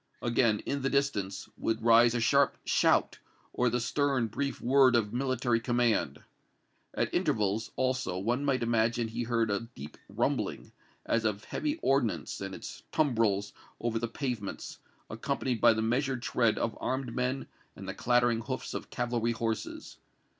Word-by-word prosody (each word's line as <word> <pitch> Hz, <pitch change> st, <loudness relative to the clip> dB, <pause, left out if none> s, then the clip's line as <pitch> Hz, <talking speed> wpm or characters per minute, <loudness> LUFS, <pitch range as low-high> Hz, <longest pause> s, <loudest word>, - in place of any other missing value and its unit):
Again, 115 Hz, -3 st, +2 dB
in 140 Hz, 0 st, -2 dB
the 135 Hz, -, 0 dB
distance, 135 Hz, -9 st, -1 dB
would 110 Hz, 0 st, -1 dB
rise 115 Hz, +1 st, +6 dB
a -, -, +1 dB
sharp 115 Hz, -1 st, +3 dB
shout, -, -, +2 dB, 0.3 s
or 125 Hz, 0 st, +2 dB
the 120 Hz, +1 st, 0 dB
stern, 135 Hz, +1 st, +1 dB
brief 140 Hz, +6 st, -3 dB
word 130 Hz, 0 st, +5 dB
of 110 Hz, -2 st, +1 dB
military 125 Hz, -2 st, +1 dB
command. 120 Hz, -1 st, 0 dB, 0.7 s
At -, -, -1 dB
intervals, 105 Hz, +1 st, 0 dB
also, 130 Hz, -8 st, 0 dB
one 120 Hz, +8 st, -1 dB
might 135 Hz, -4 st, +1 dB
imagine 115 Hz, 0 st, +1 dB
he 115 Hz, +2 st, -4 dB
heard 115 Hz, -2 st, 0 dB
a 100 Hz, +3 st, -2 dB
deep 75 Hz, +2 st, -9 dB
rumbling, -, -, -2 dB, 0.3 s
as 115 Hz, -, +1 dB
of 105 Hz, -1 st, -1 dB
heavy 295 Hz, -, -2 dB
ordnance 135 Hz, -8 st, 0 dB
and 95 Hz, -1 st, -5 dB
its -, -, -8 dB
tumbrels 110 Hz, -9 st, +1 dB, 0.3 s
over 115 Hz, -1 st, -1 dB
the 120 Hz, -, -2 dB
pavements, 115 Hz, -4 st, -5 dB, 0.3 s
accompanied 125 Hz, -4 st, -2 dB
by 120 Hz, -, +7 dB
the 110 Hz, 0 st, -1 dB
measured 125 Hz, +2 st, 0 dB
tread 115 Hz, -3 st, +2 dB
of 115 Hz, -, -1 dB
armed 130 Hz, -2 st, -2 dB
men 125 Hz, +1 st, -1 dB, 0.3 s
and 95 Hz, -, -9 dB
the 95 Hz, -, -3 dB
clattering 120 Hz, +1 st, +2 dB
hoofs -, -, -5 dB
of -, -, -5 dB
cavalry 120 Hz, -1 st, -1 dB
horses. 115 Hz, -1 st, -4 dB
120 Hz, 155 wpm, -30 LUFS, 110-130 Hz, 0.7 s, by